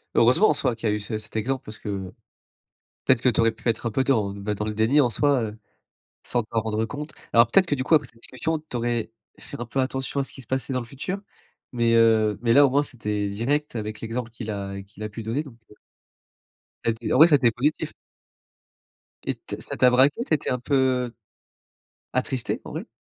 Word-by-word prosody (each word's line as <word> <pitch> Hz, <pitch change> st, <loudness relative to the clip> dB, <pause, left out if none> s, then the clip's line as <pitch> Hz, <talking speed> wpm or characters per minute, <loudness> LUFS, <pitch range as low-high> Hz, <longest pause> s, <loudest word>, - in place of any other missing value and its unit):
Heureusement 125 Hz, -, +5 dB
en -, -, +4 dB
soi 135 Hz, -4 st, 0 dB
qu'il 110 Hz, -1 st, -1 dB
y -, -, +2 dB
a -, -, +1 dB
eu -, -, -2 dB
ce 105 Hz, +1 st, -4 dB
cet 105 Hz, 0 st, -11 dB
exemple 130 Hz, +4 st, -1 dB
parce 110 Hz, 0 st, -9 dB
que, 105 Hz, -, -7 dB, 1.2 s
peut-être 130 Hz, -3 st, +4 dB
que 130 Hz, -, +4 dB
tu 120 Hz, -, -1 dB
aurais 115 Hz, 0 st, +4 dB
pu 110 Hz, +2 st, -8 dB
être 115 Hz, +1 st, 0 dB
un -, -, -2 dB
peu 135 Hz, +5 st, +1 dB
dans, 110 Hz, -8 st, +1 dB
beh, 100 Hz, +1 st, -3 dB
dans 105 Hz, -, -3 dB
le 105 Hz, -, -2 dB
déni 110 Hz, +7 st, +4 dB
en 125 Hz, -, +3 dB
soi, 140 Hz, +1 st, +2 dB
heu, 110 Hz, 0 st, -5 dB, 0.7 s
sans 120 Hz, -2 st, 0 dB
t'en 110 Hz, +1 st, -1 dB
rendre 110 Hz, 0 st, -1 dB
compte. 150 Hz, +5 st, -7 dB, 0.2 s
Alors 115 Hz, 0 st, +7 dB
peut-être 190 Hz, -, +5 dB
que 150 Hz, -, 0 dB
du 130 Hz, -, -2 dB
coup 155 Hz, -, 0 dB
après 150 Hz, -, +2 dB
cette 115 Hz, -, -20 dB
discussion, 160 Hz, +7 st, -2 dB
tu 150 Hz, -5 st, -6 dB
aurais 120 Hz, -1 st, -1 dB, 0.3 s
fait -, -, -9 dB
un 120 Hz, -, -3 dB
peu 120 Hz, +4 st, -3 dB
attention 135 Hz, +1 st, -2 dB
à -, -, -1 dB
ce -, -, -8 dB
qui -, -, -11 dB
se 120 Hz, -, -12 dB
passait 130 Hz, 0 st, -1 dB
dans 130 Hz, -, +1 dB
le 120 Hz, -, -6 dB
futur? 140 Hz, +10 st, -5 dB, 0.5 s
Mais, 115 Hz, -1 st, +2 dB
heu, 110 Hz, -2 st, +4 dB
mais 115 Hz, -1 st, +3 dB
là, 145 Hz, +2 st, +8 dB
au -, -, +3 dB
moins 140 Hz, +3 st, +3 dB
c'était 105 Hz, -6 st, -3 dB
direct 125 Hz, +9 st, -1 dB
avec 105 Hz, -1 st, -4 dB
l'exemple 115 Hz, +1 st, -4 dB
qu'il 115 Hz, -1 st, -7 dB
a 100 Hz, -1 st, -4 dB
qu'il 100 Hz, +2 st, -11 dB
a 105 Hz, -, -3 dB
pu 110 Hz, +2 st, -7 dB
donner 115 Hz, +7 st, -1 dB
donc, 135 Hz, -6 st, -13 dB
heu -, -, -16 dB, 1.1 s
ça 115 Hz, -, +2 dB
été 115 Hz, +1 st, -3 dB
en -, -, +4 dB
vrai 160 Hz, +4 st, +9 dB
ça 155 Hz, -, +6 dB
a -, -, +6 dB
été 120 Hz, -4 st, +3 dB
positif. 135 Hz, +7 st, -1 dB, 1.3 s
Et -, -, -2 dB
t -, -, -8 dB
ça -, -, -5 dB
t'a 125 Hz, -, +6 dB
braqué, 135 Hz, -, +4 dB
tu -, -, -1 dB
étais 150 Hz, -, 0 dB
un 125 Hz, -, 0 dB
peu 130 Hz, -2 st, +1 dB, 1.0 s
attristée, 130 Hz, -1 st, -1 dB
en -, -, -8 dB
vrai? -, -, -5 dB
120 Hz, 240 wpm, -25 LUFS, 110-135 Hz, 1.3 s, vrai